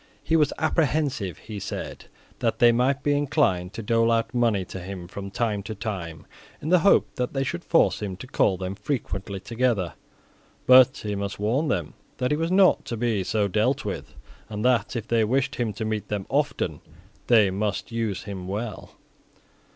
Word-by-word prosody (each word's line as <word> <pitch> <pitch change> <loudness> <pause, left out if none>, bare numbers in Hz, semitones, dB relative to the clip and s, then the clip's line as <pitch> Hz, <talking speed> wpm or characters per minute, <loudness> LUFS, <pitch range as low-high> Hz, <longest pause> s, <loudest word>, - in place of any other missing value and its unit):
He 165 - +1
was 150 -3 +3
apprehensive, 145 - 0
he 110 -2 -8
said, 100 0 -6 0.3
that - - 0
they 120 -1 +6
might 130 +4 +1
be 145 0 +2
inclined 130 - +1
to 115 - -6
dole 115 +2 +2
out 115 0 0
money 115 -6 +1
to 95 - -7
him 90 -1 -7
from 100 +2 -7
time 105 -1 -1
to 110 +2 -6
time, 95 -7 -5 0.3
in 155 - -5
the 180 0 +6
hope 195 +5 +4
that 125 -1 -2
they 135 -1 0
should 170 +6 -3
thus - - -29
force 165 - +3
him 100 -3 -3
to 130 - -9
call 100 -6 +1
them 95 +1 -4
frequently 100 -3 -4
together. 115 -5 0 0.7
But 130 0 +7
he 105 -1 -4
must 100 0 -3
warn 120 +10 +1
them 90 - -1 0.2
that 125 +1 -1
he 150 - +2
was 165 +2 -1
not 190 0 +5
to 115 - -4
be 110 -4 0
so 105 +2 0
dealt 95 - +1
with, - - -5 0.3
and 105 +1 -4
that, 125 -2 +2
if 115 -2 -4
they 115 -1 +2
wished 130 +5 0
him 120 -3 0
to 110 +3 -4
meet 110 -2 -2
them 100 -1 -3
often 135 - -1 0.5
they 110 -5 +5
must 100 +3 -2
use 115 -5 -2
him 95 -3 -6
well. 105 +1 -5
110 Hz, 190 wpm, -25 LUFS, 100-130 Hz, 0.7 s, But